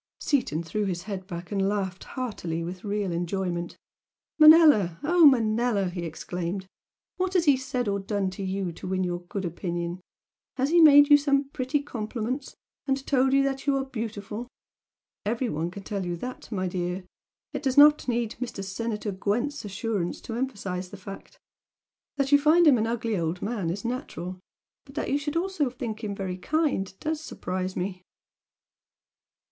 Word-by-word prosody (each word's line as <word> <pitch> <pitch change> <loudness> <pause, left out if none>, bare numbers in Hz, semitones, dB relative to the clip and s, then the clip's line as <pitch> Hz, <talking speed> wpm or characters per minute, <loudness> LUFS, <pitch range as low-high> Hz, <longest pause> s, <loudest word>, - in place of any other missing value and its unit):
Seaton 170 - 0
threw 170 +6 -3
back 200 - 0
his 175 -1 -3
head 195 -2 -5 0.3
and 195 -1 +1
laughed 190 -3 -3
heartily 175 -10 -4
with 180 +2 -6
real 205 -2 -1
enjoyment. 175 0 -2 0.6
"Manella, 305 - +7
oh, 335 +1 +6
Manella!" 225 -5 +2
he 175 -1 -4
exclaimed 175 +3 -4 0.5
"What 370 +1 -1
has 350 -2 +4
he 285 -3 +6
said 260 -2 -2
or 200 0 0
done 195 -1 -1
to 190 - -8
you 190 -1 -2
to 165 - -9
win 185 0 0
your 175 -1 -2
good 185 +2 -5
opinion? 175 +1 -3 0.6
Has 270 +3 +1
he 340 0 +6
made 290 -1 +8
you 290 - +10
some 280 -1 +1
pretty 275 +1 -1
compliments, 240 +1 -4 0.3
and 270 0 0
told 265 -1 +3
you 275 0 +5
that 275 0 -2
you 275 -1 +3
are 270 - -1
beautiful? 225 -2 -5 0.8
Every 230 +4 -1
one 160 0 -2
can 195 +3 -9
tell 200 0 -3
you 175 -1 -2
that, 250 +9 -7
my 185 -3 -1
dear! 180 +1 -3 0.5
It - - -3
does 270 -1 -1
not 295 0 +7
need 235 -2 0
Mr. 235 -5 -4
Senator 210 +2 -3
Gwent's 225 +10 -1
assurance 200 -3 -2
to 230 - -6
emphasise 200 -7 -3
the 205 - -9
fact! 195 +1 -10 0.8
That 275 0 0
you 285 - +7
find 315 +4 +5
him 275 -6 +6
an 220 - +1
ugly 230 -1 -1
old 165 +2 -2
man 205 -6 -2
is 200 +6 -4
natural 185 - -4 0.4
but 275 -1 -16
that 310 - -2
you 285 - +2
should 295 +2 -2
also 350 -6 0
think 235 -3 -6
him 205 -2 -3
'very 190 -2 -4
kind' 295 - 0
DOES 315 0 -2
surprise 185 -10 -4
me!" 185 0 -3
215 Hz, 175 wpm, -27 LUFS, 185-270 Hz, 0.8 s, you